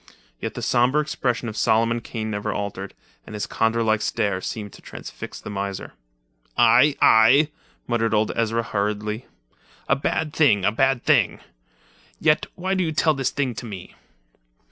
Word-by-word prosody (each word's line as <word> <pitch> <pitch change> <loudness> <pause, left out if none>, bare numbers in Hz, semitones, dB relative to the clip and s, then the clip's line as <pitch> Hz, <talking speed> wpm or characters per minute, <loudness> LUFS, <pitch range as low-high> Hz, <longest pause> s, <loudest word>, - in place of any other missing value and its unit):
Yet - - -5
the - - -5
sombre 125 +5 +3
expression 125 -5 -1
of 110 - -5
Solomon 115 +2 +2
Kane 110 -1 -5
never 105 -1 -2
altered, 100 -1 -5 0.3
and 105 - -8
his 105 -1 -2
condor 115 +3 0
like 110 -1 +1
stare 100 -5 -1
seemed 105 0 -5
to - - -14
transfix - - -9
the - - -8
miser. 100 -1 -5 0.6
"Aye, 125 +5 +5
aye!" 130 +7 +6 0.4
muttered 115 -2 0
old 110 0 +2
Ezra 115 0 0
hurriedly; 105 +2 -2 0.6
"a 125 - +3
bad 150 +2 -2
thing, 105 - +3
a - - +3
bad 135 +2 +1
thing! - - +3 0.8
Yet 155 -1 +2
why 185 +2 -2
do 190 -1 +1
you 160 - -1
tell 155 0 +2
this 135 -2 -1
thing 135 -3 -2
to 115 +2 -7
me?" 95 -4 -9
115 Hz, 165 wpm, -23 LUFS, 105-135 Hz, 0.8 s, aye